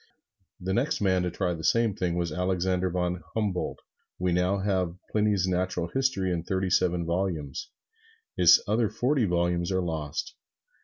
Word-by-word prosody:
The 95 +1 -2
next 135 +9 +1
man 95 -2 +2
to 90 - 0
try 90 +1 -1
the 80 -1 -7
same 115 +2 +3
thing 90 -3 -1
was 85 -2 -1
Alexander 90 +1 0
von 90 0 -1
Humboldt. 105 -5 -1 0.4
We 90 0 0
now 90 +3 +2
have 95 -3 0 0.2
Pliny's 105 -3 +2
"Natural 90 -1 -1
History" 130 -9 +1
in 85 - -1
thirty 95 +2 -2
seven 90 -2 +2
volumes. 85 -5 -2 0.7
His - - +7
other 110 +1 +2
forty 125 +3 +1
volumes 85 0 0
are 95 -1 +1
lost. 80 -4 -3
90 Hz, 155 wpm, -27 LUFS, 85-100 Hz, 0.7 s, His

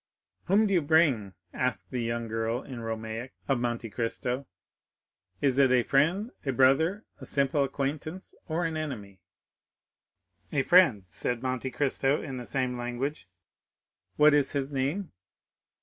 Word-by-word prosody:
"Whom 200 +4 +4
do 200 - +1
you 175 - +4
bring?" 145 - +2 0.2
asked 100 -8 -2
the 125 - -2
young 115 0 -2
girl 115 +2 -2
in 130 -3 -8
Romaic, 115 +2 -5
of 135 -3 +2
Monte 120 -1 -2
Cristo; 125 +4 -2 0.9
"is 135 -2 +2
it 135 -2 +5
a 125 -1 +4
friend, 170 - +2
a 135 - 0
brother, 140 - +3
a - - -9
simple 140 +1 +1
acquaintance, 145 +6 -4
or 165 +1 -1
an 160 -1 -2
enemy." 105 - -6 1.3
"A 140 -2 +1
friend," 140 - +5
said 120 +6 -2
Monte 130 0 -2
Cristo 135 +2 +1
in 135 -3 -6
the 125 - -6
same 125 -2 -2
language. 120 0 -4 0.9
"What 150 0 +6
is 145 -2 +2
his 140 -1 -2
name?" 145 +8 -2
135 Hz, 145 wpm, -28 LUFS, 120-150 Hz, 1.3 s, What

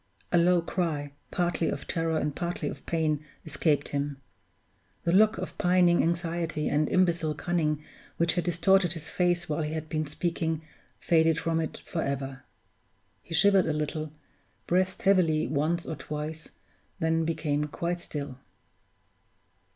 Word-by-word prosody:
A 175 - +4
low 175 0 +4
cry, 155 -5 -2 0.2
partly 175 -2 0
of - - -4
terror 165 -1 0
and 150 -2 -1
partly 170 -3 -2
of 140 - -6
pain, 155 -3 0 0.2
escaped 150 -1 +1
him; 140 -1 -2 0.8
the 170 - +1
look 215 +4 +5
of - - -5
pining 180 -1 +4
anxiety 165 -2 -1
and 150 +1 +1
imbecile 170 -4 +2
cunning 155 -2 0 0.3
which 170 0 +3
had 175 - 0
distorted 175 +1 +3
his 160 -2 -6
face 175 -1 +1
while 150 +1 -1
he 150 0 -2
had 160 -1 -4
been 155 -1 -1
speaking, 160 0 -2 0.3
faded 160 -1 +3
from 165 0 0
it 160 - -4
forever. 135 -4 -3 0.8
He 165 - -5
shivered 195 +1 +5
a 155 - +1
little, 150 0 -3 0.5
breathed 185 +1 +1
heavily 175 -6 +4
once 155 +4 0
or 160 - -4
twice, 155 +1 -6 0.5
then 160 0 +1
became 150 -2 0
quite 170 +3 -3
still. 140 -5 -6
160 Hz, 145 wpm, -28 LUFS, 150-175 Hz, 0.8 s, look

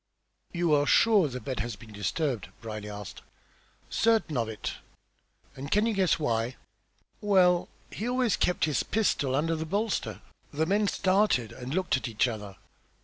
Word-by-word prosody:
"You 170 -3 +1
are 145 0 +3
sure 210 -4 +5
the 125 -2 -5
bed 130 -2 -4
has 115 +1 -3
been 110 0 -14
disturbed?" 120 - -2
Brierly 110 -2 -6
asked. 105 -1 -8 0.7
"Certain 225 -9 +2
of 115 -3 0
it!" 110 - -5 0.8
"And 135 +1 -7
can 210 +2 +3
you 230 - +1
guess 190 -3 +2
why?" 120 -4 -1 0.7
"Well, 185 -4 +4 0.2
he 225 +4 -3
always 250 -4 +2
kept 180 - +1
his 150 -2 +1
pistol 145 -11 0
under 165 +4 +1
the 160 - -3
bolster." 200 +6 -2 0.3
The 155 +2 0
men 205 +4 +2
started 190 - +2
and 130 +4 -6
looked 185 -7 +1
at 130 - -4
each 115 +2 +1
other. 105 -4 -6
150 Hz, 160 wpm, -28 LUFS, 120-195 Hz, 0.8 s, sure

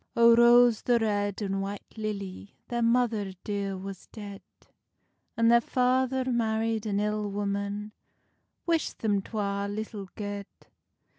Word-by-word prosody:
O 235 0 +7
ROSE 240 -1 +6
the 240 -1 +3
Red 205 -2 -1
and 195 -1 -1
White 200 +1 -6
Lilly, 200 -3 -5
Their 240 0 -1
mother 230 -4 +1
dear 200 -2 -2
was 195 0 -8
dead, 200 -3 -9 1.0
And 230 0 +4
their 235 0 +6
father 255 +1 +1
married 225 -1 0
an 200 -1 0
ill 210 0 -1
woman, 200 +1 -3 0.8
Wishd 330 -2 0
them 205 -3 +1
twa 200 -1 -2
little 205 -2 -5
guede. 205 -1 -5
210 Hz, 130 wpm, -28 LUFS, 200-235 Hz, 1.0 s, O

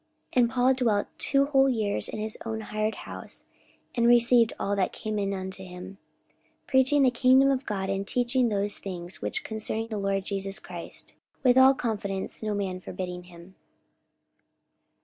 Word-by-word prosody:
44:028:030 250 - +4
And 235 - +3
Paul 255 +1 +3
dwelt 230 -6 +1
two 275 0 +2
whole 270 -1 +4
years 215 -5 0
in - - -5
his 215 0 -3
own 220 -1 -4
hired 215 0 -2
house, - - -7 0.5
and 235 -1 +2
received 240 -1 +5
all 200 +1 0
that 190 -2 0
came 215 -1 -3
in 200 -1 -1
unto 190 0 -5
him, 185 +2 -10 0.7
44:028:031 - - -44
Preaching 265 +2 +4
the 255 - +5
kingdom 260 +3 +5
of 265 -1 -2
God, 195 -3 -2
and 195 0 -2
teaching 245 +1 +1
those 205 -1 0
things 175 -4 -7
which 105 - -3
concern 220 0 -3
the 215 - -2
Lord 195 -1 -1
Jesus 195 0 -2
Christ, - - -7 0.3
with 250 -2 +5
all 260 +1 +7
confidence, 200 -6 -3
no 215 -1 -2
man 190 -2 -2
forbidding 180 -1 -6
him. 175 +1 -14
215 Hz, 170 wpm, -27 LUFS, 195-245 Hz, 0.7 s, all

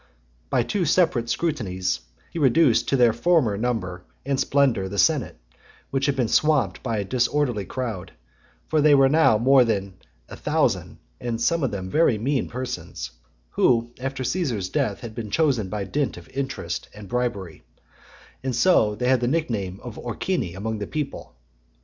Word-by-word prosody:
XXXV. - - -37
By 125 - +2
two 195 - -1
separate 150 -8 +2
scrutinies 100 - -1 0.3
he 170 - -4
reduced 135 -2 +4
to 135 - +2
their 120 -3 +5
former 120 -3 +2
number 100 -5 -2 0.2
and 135 -1 0
splendour 130 -8 +2
the 100 - -6
senate, 95 -9 +2 0.5
which 135 +1 0
had 140 - +1
been 125 -4 +1
swamped 135 - +2
by 115 -4 -2
a 100 - -1
disorderly 125 -2 0
crowd; 115 -8 -5 0.6
for 155 -1 +2
they 150 -1 +6
were 135 -1 +5
now 155 -7 +4
more 130 +3 +5
than 100 -4 -1 0.4
a - - -23
(99) - - -8
thousand, - - 0 0.2
and 115 -2 -3
some 165 +8 +1
of 135 - +1
them 95 -3 -5
very 155 -8 +3
mean 130 +5 -1
persons, 120 - -5 0.4
who, 115 -1 +2
after 135 0 -3
Caesar's 125 - -1
death, 100 +3 -1
had 115 -3 -7
been 110 -1 -6
chosen 125 - +1
by 105 0 -3
dint 140 +8 -2
of - - -12
interest 135 0 -4
and 105 -1 -10
bribery, 100 -7 -3 0.9
so 125 -3 +4
that - - -17
they 125 - +1
had 130 -1 +3
the 120 - +1
nickname 110 - -1
of 120 -3 -8
Orcini 120 - -2
among 110 +2 -3
the 105 - -4
people. 150 - -5
120 Hz, 175 wpm, -24 LUFS, 105-140 Hz, 0.9 s, they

